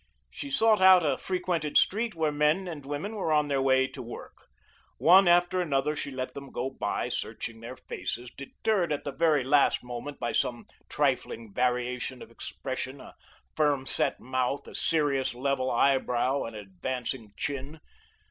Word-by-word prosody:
She 285 Hz, -, -6 dB
sought 225 Hz, -6 st, +4 dB
out 185 Hz, -2 st, +7 dB
a 140 Hz, -3 st, +2 dB
frequented 180 Hz, -3 st, -1 dB
street 220 Hz, 0 st, +2 dB
where 160 Hz, -2 st, +1 dB
men 150 Hz, +6 st, +1 dB
and 150 Hz, -5 st, -7 dB
women 150 Hz, +9 st, -4 dB
were 190 Hz, -6 st, -1 dB
on 150 Hz, -1 st, +2 dB
their 140 Hz, -1 st, +1 dB
way 130 Hz, 0 st, +4 dB
to 130 Hz, -, -8 dB
work. 120 Hz, -1 st, -10 dB, 0.5 s
One 185 Hz, +3 st, +6 dB
after 175 Hz, +1 st, +4 dB
another, 150 Hz, -2 st, 0 dB
she 145 Hz, -, -4 dB
let 130 Hz, -1 st, -5 dB
them 140 Hz, -1 st, -8 dB
go 130 Hz, +2 st, -3 dB
by, -, -, -2 dB
searching 115 Hz, -1 st, -4 dB
their 120 Hz, +3 st, -8 dB
faces, 120 Hz, -1 st, -5 dB
deterred 175 Hz, +5 st, -1 dB
at 145 Hz, -, -2 dB
the 140 Hz, -, -3 dB
very 155 Hz, -1 st, +2 dB
last 140 Hz, 0 st, +3 dB
moment 125 Hz, +4 st, -7 dB
by 120 Hz, -, -1 dB
some 120 Hz, -1 st, -1 dB, 0.2 s
trifling 115 Hz, -3 st, -1 dB
variation 125 Hz, +1 st, -1 dB
of -, -, -15 dB
expression, 130 Hz, +3 st, -6 dB
a -, -, -12 dB, 0.4 s
firm 145 Hz, -3 st, +2 dB
set -, -, +1 dB
mouth, 130 Hz, +1 st, -2 dB
a -, -, -10 dB
serious, 145 Hz, -6 st, +1 dB
level 130 Hz, 0 st, 0 dB
eyebrow, 130 Hz, +1 st, +2 dB
an 115 Hz, -, -7 dB
advancing 110 Hz, +3 st, -5 dB
chin. 145 Hz, +2 st, -4 dB
140 Hz, 165 wpm, -28 LUFS, 125-160 Hz, 0.5 s, out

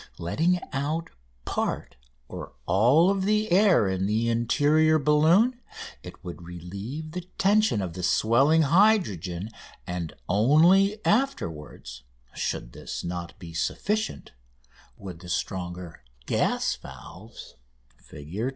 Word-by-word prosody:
Letting 160 Hz, -, 0 dB
out 150 Hz, +4 st, -2 dB, 0.3 s
part -, -, -3 dB, 0.3 s
or -, -, -8 dB
all 125 Hz, -, +4 dB
of 195 Hz, -1 st, -1 dB
the 215 Hz, 0 st, +1 dB
air 185 Hz, -, +5 dB
in 95 Hz, 0 st, -1 dB
the 110 Hz, +3 st, 0 dB
interior 145 Hz, +7 st, +3 dB
balloon, 165 Hz, -, +3 dB, 0.4 s
it -, -, -12 dB
would 90 Hz, -1 st, -8 dB
relieve 100 Hz, -, -7 dB
the 180 Hz, +2 st, -4 dB, 0.2 s
tension 200 Hz, -, +3 dB
of 90 Hz, -3 st, -5 dB
the 90 Hz, -, -6 dB
swelling 135 Hz, -, +3 dB
hydrogen; 135 Hz, -, +2 dB, 0.3 s
and 90 Hz, -3 st, -5 dB
only 170 Hz, -, +4 dB
afterwards, 80 Hz, -, -2 dB, 0.3 s
should -, -, -4 dB
this -, -, -7 dB
not 85 Hz, 0 st, -6 dB
be 85 Hz, -5 st, -10 dB
sufficient, 210 Hz, -, -2 dB, 0.7 s
would 90 Hz, -4 st, -9 dB
the 90 Hz, -, -11 dB
stronger 90 Hz, -2 st, -4 dB, 0.2 s
gas -, -, 0 dB
valves 110 Hz, +6 st, -12 dB, 0.5 s
(Fig. 75 Hz, +4 st, -11 dB
120 Hz, 115 wpm, -26 LUFS, -, 0.7 s, air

